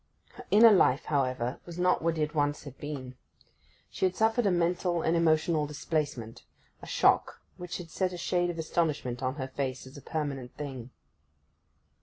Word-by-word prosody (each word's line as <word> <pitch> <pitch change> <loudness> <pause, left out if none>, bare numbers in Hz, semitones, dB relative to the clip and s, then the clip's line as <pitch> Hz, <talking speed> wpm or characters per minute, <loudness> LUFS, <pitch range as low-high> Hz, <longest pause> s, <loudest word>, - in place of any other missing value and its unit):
Her - - -11
inner 225 +2 +8
life, 145 -7 +4
however, 130 -3 -1
was 170 -1 -8
not 180 0 +2
what 165 0 0
it 150 0 -1
once 145 -1 0
had 140 -3 -10
been. 130 -4 -6 0.7
She - - -6
had 185 -1 0
suffered 225 0 +2
a - - +3
mental 175 0 +1
and 165 - +2
emotional 160 -2 +2
displacement—a 145 -6 -5
shock, - - +2 0.2
which 180 0 -5
had 170 -3 -9
set 185 +2 0
a 180 - -6
shade 175 +1 0
of 175 - -4
astonishment 150 -6 -1
on 130 0 -1
her 135 -3 -4
face 130 -1 -3
as 130 +2 -12
a - - -10
permanent 140 -5 -4
thing. 130 -5 -6
155 Hz, 170 wpm, -29 LUFS, 135-175 Hz, 0.7 s, inner